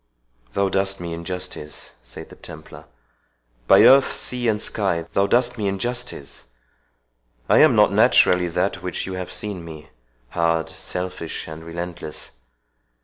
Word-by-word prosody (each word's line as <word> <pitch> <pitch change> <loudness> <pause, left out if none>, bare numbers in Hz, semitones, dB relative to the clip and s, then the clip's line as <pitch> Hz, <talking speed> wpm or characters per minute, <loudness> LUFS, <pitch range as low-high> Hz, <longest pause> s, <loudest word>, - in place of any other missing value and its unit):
"Thou 100 0 +1
dost 95 0 -1
me 85 -1 -5
injustice," 85 -3 -6
said - - -11
the - - -13
Templar; - - -11 0.8
"by - - +7
earth, 135 0 +6
sea, 125 -1 -2
and 105 -2 +1
sky, 95 -7 -1
thou 100 0 +2
dost 120 +2 +2
me 105 - 0
injustice! 120 - -5 1.0
I - - +5
am - - +6
not - - +5
naturally 90 -1 +4
that 90 +2 -1
which 90 -1 -4
you 95 - -5
have 90 -1 -5
seen 100 -5 -5
me, 80 -1 -10 0.4
hard, 85 0 0
selfish, 90 -3 -5
and 80 0 -9
relentless. 85 -1 -7
90 Hz, 140 wpm, -22 LUFS, 85-100 Hz, 1.0 s, by